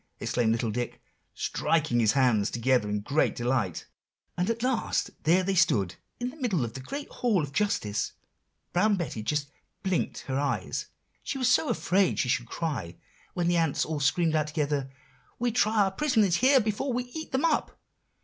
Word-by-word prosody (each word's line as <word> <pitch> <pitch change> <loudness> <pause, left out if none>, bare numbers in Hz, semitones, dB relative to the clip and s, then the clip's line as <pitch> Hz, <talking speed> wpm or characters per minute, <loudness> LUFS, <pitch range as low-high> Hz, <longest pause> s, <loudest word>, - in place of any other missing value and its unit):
exclaimed 120 -2 +1
little 115 -1 0
Dick, 120 +2 -3 0.4
striking 155 -7 +1
his 110 -3 +4
hands 120 -6 +3
together 120 -2 +1
in 105 0 -1
great 145 +8 +1
delight. 120 -8 -1 0.5
"And 180 +3 0
at 230 +1 -1
last 255 -3 0
there 175 +4 +4
they 195 +1 0
stood 130 - +3 0.3
in 245 +1 -2
the 310 - -15
middle 190 - +1
of 115 - -7
the 130 - -6
great 280 - -6
Hall 215 -9 +1
of 140 -1 -6
Justice. 170 - 0 0.6
Brown 205 +4 +3
Betty 155 - -4
just 145 +5 -2 0.3
blinked 190 -3 -1
her 135 0 -2
eyes, 130 -10 -2 0.3
she - - -4
was 255 -2 +2
so 295 - +3
afraid 190 0 +2
she 125 - 0
should 120 0 0
cry, 130 - -3 0.4
when 175 -1 0
the 175 0 +3
ants 165 -4 +1
all 155 -2 -3
screamed 160 +3 +2
out 155 -1 +1
together, 145 -3 -1 0.5
'We 240 0 0
try 215 -2 +3
our 195 - 0
prisoners 215 - +2
here 265 +2 +5
before 220 +4 -1
we 250 +1 -1
eat 315 +6 -8
them 265 +4 +1
up. 315 -3 0
160 Hz, 180 wpm, -28 LUFS, -, 0.6 s, here